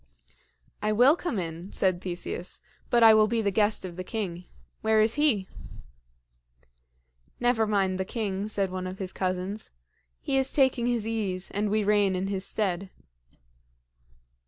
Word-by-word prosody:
"I 215 Hz, -, 0 dB
will 250 Hz, +8 st, +6 dB
come 350 Hz, -9 st, -3 dB
in," 170 Hz, +1 st, -5 dB
said 185 Hz, -2 st, +2 dB
Theseus, 180 Hz, 0 st, -4 dB, 0.3 s
"but 235 Hz, -1 st, +4 dB
I 225 Hz, -1 st, +9 dB
will 215 Hz, 0 st, +5 dB
be 225 Hz, 0 st, 0 dB
the 200 Hz, -, +1 dB
guest 210 Hz, 0 st, +1 dB
of 175 Hz, -1 st, -8 dB
the 185 Hz, -, -4 dB
king. 180 Hz, -4 st, -4 dB, 0.4 s
Where 220 Hz, 0 st, +3 dB
is 215 Hz, +1 st, +3 dB
he?" 270 Hz, -11 st, +2 dB, 1.9 s
"Never 240 Hz, -2 st, +2 dB
mind 195 Hz, -3 st, +1 dB
the -, -, +1 dB
king," 200 Hz, -1 st, -3 dB
said 200 Hz, -3 st, 0 dB
one 185 Hz, 0 st, -4 dB
of 185 Hz, +1 st, -6 dB
his 190 Hz, -2 st, -5 dB
cousins. 185 Hz, +3 st, -3 dB, 0.5 s
"He 270 Hz, -, -1 dB
is 265 Hz, 0 st, +1 dB
taking 260 Hz, -4 st, +2 dB
his 235 Hz, -3 st, 0 dB
ease, 200 Hz, -5 st, -3 dB
and 205 Hz, +1 st, -1 dB
we 215 Hz, +1 st, +1 dB
reign 205 Hz, -2 st, +3 dB
in 190 Hz, +1 st, -2 dB
his 190 Hz, -1 st, -2 dB
stead." 195 Hz, -3 st, -2 dB
205 Hz, 160 wpm, -27 LUFS, 185-225 Hz, 1.9 s, I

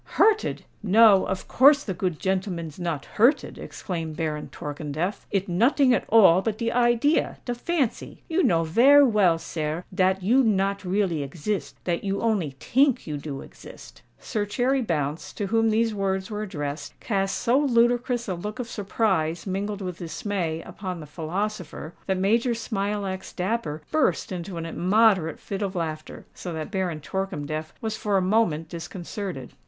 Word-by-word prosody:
"Hurted! 435 Hz, 0 st, +3 dB, 0.2 s
no—of 200 Hz, -2 st, +4 dB
course 285 Hz, +3 st, +6 dB
de 195 Hz, -, -3 dB
good 180 Hz, -2 st, -2 dB
gentleman's 185 Hz, -4 st, -2 dB
not 165 Hz, -5 st, -3 dB
hurted," 240 Hz, +7 st, +2 dB
exclaimed 165 Hz, -4 st, -5 dB
Baron 155 Hz, -2 st, -3 dB
Torkemdef: 150 Hz, +6 st, -4 dB
"it 195 Hz, -1 st, -1 dB
noting 250 Hz, -, +3 dB
at -, -, 0 dB
all 190 Hz, -5 st, +7 dB
but 215 Hz, +1 st, -2 dB
de 230 Hz, 0 st, -1 dB
idea—de 245 Hz, +2 st, +1 dB
fancy. 275 Hz, 0 st, -2 dB
You 335 Hz, +2 st, +1 dB
know 165 Hz, -, +3 dB
vare 270 Hz, -, +6 dB
well, 205 Hz, -8 st, +3 dB
sare, 160 Hz, +1 st, -4 dB
dat 190 Hz, 0 st, +2 dB
you 250 Hz, +7 st, +4 dB
not 200 Hz, -2 st, +1 dB
really 185 Hz, -4 st, 0 dB
exist—dat 170 Hz, +3 st, -3 dB
you 195 Hz, 0 st, -1 dB
only 195 Hz, -12 st, 0 dB
tink 270 Hz, 0 st, +2 dB
you 150 Hz, -2 st, -4 dB
do 140 Hz, -2 st, -6 dB
exist——" -, -, -13 dB, 0.2 s
Sir 210 Hz, -, -2 dB
Cherry 260 Hz, +5 st, +1 dB
Bounce, 155 Hz, -, -2 dB
to 205 Hz, -, -3 dB
whom 225 Hz, +2 st, +2 dB
these 225 Hz, +1 st, +2 dB
words 190 Hz, -1 st, -2 dB
were 210 Hz, 0 st, -3 dB
addressed, 150 Hz, -7 st, -5 dB
cast 195 Hz, -3 st, -1 dB
so 245 Hz, +3 st, +2 dB
ludicrous 240 Hz, -2 st, +2 dB
a 190 Hz, -, -1 dB
look 210 Hz, +6 st, -5 dB
of 250 Hz, -2 st, -4 dB
surprise 190 Hz, -6 st, -1 dB
mingled 200 Hz, +1 st, -3 dB
with 180 Hz, -1 st, -5 dB
dismay 170 Hz, -2 st, -3 dB
upon 185 Hz, -3 st, -6 dB
the 155 Hz, -, -8 dB
philosopher, 175 Hz, +2 st, -4 dB
that 190 Hz, -1 st, +1 dB
Major 230 Hz, +5 st, +2 dB
Smilax 200 Hz, -4 st, -3 dB
Dapper 180 Hz, -6 st, -2 dB
burst 310 Hz, -7 st, +1 dB
into 180 Hz, 0 st, -5 dB
an 165 Hz, -, -4 dB
immoderate 185 Hz, -1 st, +2 dB
fit 195 Hz, 0 st, -5 dB
of 195 Hz, -1 st, -2 dB
laughter; 155 Hz, -3 st, -5 dB
so 180 Hz, -, -7 dB
that 160 Hz, +3 st, -5 dB
Baron 180 Hz, -6 st, -2 dB
Torkemdef 155 Hz, -3 st, -4 dB
was 220 Hz, -1 st, -2 dB
for 205 Hz, -2 st, +1 dB
a -, -, +2 dB
moment 185 Hz, -6 st, +1 dB
disconcerted. 170 Hz, -, -6 dB
195 Hz, 155 wpm, -25 LUFS, 165-225 Hz, 0.2 s, all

